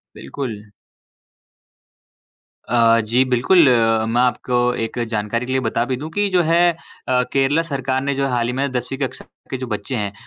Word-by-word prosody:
बिल्कुल। 105 - -6 2.0
अ, 115 -1 +4
जी 120 +4 +2
बिल्कुल, 140 +6 +4 0.4
मैं 120 +2 +1
आपको 125 0 0 0.3
एक 115 - -6
जानकारी 110 +2 -2
के 130 - -4
लिए 130 - +1
बता 120 -2 -1
भी 130 0 -2
दूँ 150 +4 -6
कि 205 +4 0
जो 180 -1 +3
है 165 +2 +2 0.5
अ, 125 -1 +3
केरला 140 +4 +2
सरकार 135 -4 -2
ने 140 0 -1
जो 140 0 -1
है 135 - -1
हाल 120 -1 0
ही 125 - -2
में 135 +1 -1
10वीं 125 +2 -3
कक्षा 135 -3 -4 0.3
के 130 - -2
जो 130 0 -5
बच्चे 105 +3 -4
हैं 100 -2 -3
125 Hz, 180 wpm, -20 LUFS, 115-140 Hz, 2.0 s, अ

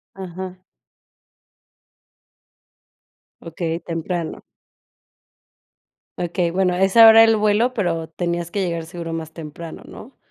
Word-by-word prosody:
Aja. 185 0 -7 2.8
Okey, 165 0 -4
temprano. 165 0 -4 1.8
Okey, 175 0 -1
bueno, 180 +1 +1
esa 195 +5 +6
hora 225 0 +9
el 225 0 +4
vuelo, 215 +4 +1
pero 165 -6 -2
tenías 170 0 -3
que 200 +3 -2
llegar 170 -2 -3
seguro 170 -1 -6
más 160 -1 -6
temprano, 160 +1 -9
¿no? 255 +5 -13
175 Hz, 100 wpm, -21 LUFS, 165-195 Hz, 2.8 s, hora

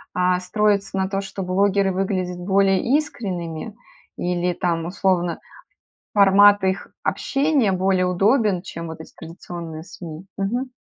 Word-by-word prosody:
э, 180 0 +2
строится 200 +1 0
на 190 0 0
том, 195 0 -1
что 195 0 -6
блогеры 195 +1 +2
выглядят 185 -2 -2
более 195 +1 +2 0.2
искренними? 190 - -5 0.4
Или 175 0 -1
там, 170 -2 -1
условно, 180 -2 0 0.8
формат 200 0 +6
их 190 0 -1
общения 275 -7 +1
более 185 0 +1
удобен, 195 0 +2
чем 165 -3 -7
вот 160 0 -8
эти - - -11
традиционные 165 -1 -8
СМИ? 170 0 -10
Мгм. 245 +6 -2
190 Hz, 125 wpm, -22 LUFS, 175-200 Hz, 0.8 s, формат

